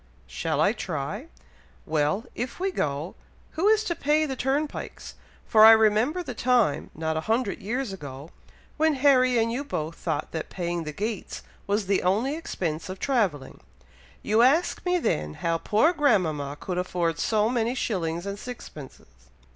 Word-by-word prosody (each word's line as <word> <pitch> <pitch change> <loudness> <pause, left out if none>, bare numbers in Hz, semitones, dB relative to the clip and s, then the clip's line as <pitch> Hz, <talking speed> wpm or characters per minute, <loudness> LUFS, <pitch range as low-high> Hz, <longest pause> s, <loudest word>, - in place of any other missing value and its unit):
"Shall 65 - -3
I - - +4
try? - - -4 0.6
Well, 155 +7 0
if 245 +4 -5
we 385 +1 0
go, 150 - -2 0.4
who 345 +6 0
is 435 0 +4
to 355 - -1
pay 305 0 +1
the 270 -3 -3
turnpikes, 275 +4 -3 0.3
for 215 -1 +5
I 225 +1 +11
remember 220 +10 +3
the 260 - -6
time, 240 - +1
not 160 0 -2
a - - -1
hundred 225 -2 0
years 240 +1 -3
ago, 145 -3 -9 0.5
when 315 0 +3
Harry 255 -2 +4
and 230 0 +2
you 255 +4 -2
both 160 - -4
thought 155 -3 -3
that 160 - -5
paying 175 -2 -3
the 155 - -4
gates 210 +5 -4 0.2
was 205 +1 0
the 195 0 +1
only 220 +11 +1
expense 170 - -4
of 185 - -5
travelling. 190 - -1 0.6
You 215 +2 +3
asked 305 +8 +2
me 360 0 +3
then 75 - -1
how 165 0 -1
poor 225 - +3
grandmama 165 - +1
could 180 -1 -3
afford 175 -3 -1
so 215 -1 +2
many 235 0 0
shillings 175 -7 -2
and 200 0 -5
sixpences." 185 - -9
215 Hz, 165 wpm, -26 LUFS, 165-260 Hz, 0.6 s, I